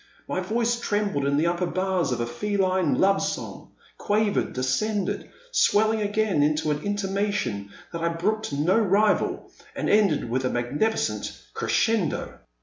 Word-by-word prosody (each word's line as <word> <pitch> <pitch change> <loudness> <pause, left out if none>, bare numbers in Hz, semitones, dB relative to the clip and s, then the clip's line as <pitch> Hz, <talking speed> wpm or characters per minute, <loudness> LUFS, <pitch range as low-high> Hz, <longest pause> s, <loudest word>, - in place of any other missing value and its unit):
My - - -2
voice 230 +5 0
trembled 205 -11 0
in 140 0 +2
the 155 - +2
upper 175 +1 0
bars 185 -3 0
of 125 - -1
a - - 0
feline 185 - 0
love 195 +1 +4
song, - - -5 0.3
quavered, 210 0 +1
de 130 - -3
scended, 205 +11 -1 0.2
swelling 220 - +3
again 205 -5 +1
into 150 +1 +1
an 150 0 -2
intimation 195 - -2 0.2
that 170 - -4
I 170 - +1
brooked 205 +6 -1
no 155 +9 +2
rival, 210 0 +1 0.2
and - - -1
ended 200 - +3
with 130 +3 -1
a 130 - +1
magnificent 120 - -1
crescendo. 220 -8 0
190 Hz, 145 wpm, -25 LUFS, 145-210 Hz, 0.3 s, love